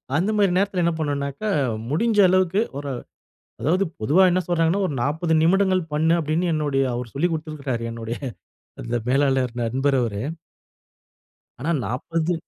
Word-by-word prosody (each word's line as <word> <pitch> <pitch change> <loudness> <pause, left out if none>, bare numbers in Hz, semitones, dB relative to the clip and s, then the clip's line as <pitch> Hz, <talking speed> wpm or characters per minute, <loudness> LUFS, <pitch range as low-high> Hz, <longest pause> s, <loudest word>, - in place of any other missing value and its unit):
அந்த 180 +7 +1
மாதிரி 200 -3 +3
நேரத்துல 195 -2 +1
என்ன 170 - +3
பண்ணணும்ன்னாக்க, 140 +2 -3 0.5
முடிஞ்ச 210 - +1
அளவுக்கு 185 +2 +2 0.2
ஒரு 145 -1 -5 0.7
அதாவது 180 +9 +2 0.2
பொதுவா 155 - +4
என்ன 185 - +2
சொல்றாங்கன்னா, 175 +2 +2
ஒரு 145 - -4
40 160 +5 0
நிமிடங்கள் 185 +2 +3
பண்ணு 160 +2 +3
அப்படின்னு 160 +3 0
என்னோடய 140 -4 0
அவர் 120 -1 -5
சொல்லிக் 165 +5 0
கொடுத்திருக்கிறாரு 150 -6 -3
என்னோடய 115 0 -5 0.6
அந்த 120 +1 -2
மேலாளர் 135 -2 +2
நண்பர் 135 +4 +1
அவரு. 105 -4 -2 1.4
ஆனா 150 - -3 0.2
40 165 - -1
155 Hz, 135 wpm, -23 LUFS, 135-180 Hz, 1.4 s, பொதுவா